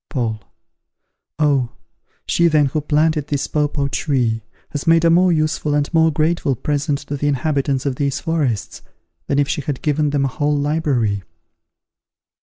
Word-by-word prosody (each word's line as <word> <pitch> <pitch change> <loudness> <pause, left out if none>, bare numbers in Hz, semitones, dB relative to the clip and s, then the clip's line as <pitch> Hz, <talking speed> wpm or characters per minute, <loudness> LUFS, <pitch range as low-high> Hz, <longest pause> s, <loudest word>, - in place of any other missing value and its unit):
Paul. 115 -6 -2 1.0
Oh! 140 -5 +1 0.5
she, 170 - +3
then, 155 -3 +3
who 145 +3 -1
planted 150 0 +1
this 145 -1 -1
papaw 145 -2 0
tree, 125 -6 0 0.3
has 145 +1 -5
made 165 0 +5
a 165 - +5
more 180 +2 +4
useful 155 -2 0
and 145 +2 -1
more 160 0 +5
grateful 155 -2 0
present 145 +2 -1
to 145 - -4
the 145 - -1
inhabitants 140 -1 0
of 135 -3 -1
these 140 -1 -1
forests 145 - -2 0.5
than 140 - 0
if 145 -1 +2
she 150 - -2
had 140 -1 -4
given 150 -1 +1
them 140 -1 +1
a - - 0
whole 145 +2 0
library. 140 - 0
145 Hz, 160 wpm, -19 LUFS, 140-155 Hz, 1.0 s, made